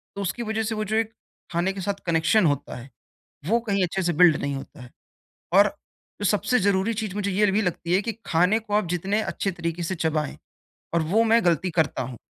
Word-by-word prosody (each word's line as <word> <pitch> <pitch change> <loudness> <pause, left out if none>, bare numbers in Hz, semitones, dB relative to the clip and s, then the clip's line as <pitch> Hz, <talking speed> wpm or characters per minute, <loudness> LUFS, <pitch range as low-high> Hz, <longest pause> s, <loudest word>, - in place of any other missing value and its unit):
तो 200 - -4
उसकी 200 +5 -2
वज़ह 220 0 -1
से 220 +1 -2
वो 215 - -2
जो 215 +2 -2
एक 225 0 0 0.4
खाने 175 +3 0
के 195 - -6
साथ 200 +2 -1
कनेक्शन 170 +4 +3
होता 145 -3 -1
है 125 +2 -10 0.6
वो 225 +6 +3
कहीं 200 -1 +2
अच्छे 190 +2 -2
से 175 -1 +1
बिल्ड 170 -1 +6
नहीं 140 -1 -3
होता 135 +1 -9
है। 125 - -12 0.6
और 200 +2 +7 0.5
जो - - -3
सबसे 215 +5 +2
ज़रूरी 200 +3 +1
चीज़ 215 -3 -4
मुझे 200 -1 -1
ये 205 +2 +3
भी 205 - +2
लगती 175 -2 -1
है 190 - +4
की 230 - -2
खाने 180 +6 +3
को 215 -2 -6
आप 210 -2 +2
जितने 190 +5 0
अच्छे 200 - -2
तरीके 170 -1 -4
से 170 +3 -2
चबाएँ 160 -4 -1 0.6
और 170 - +3
वो 225 +2 +5
मैं 230 +1 +3
गलती 175 +1 +2
करता 145 -4 0
हूँ। 125 0 -7
190 Hz, 225 wpm, -24 LUFS, 170-210 Hz, 0.6 s, और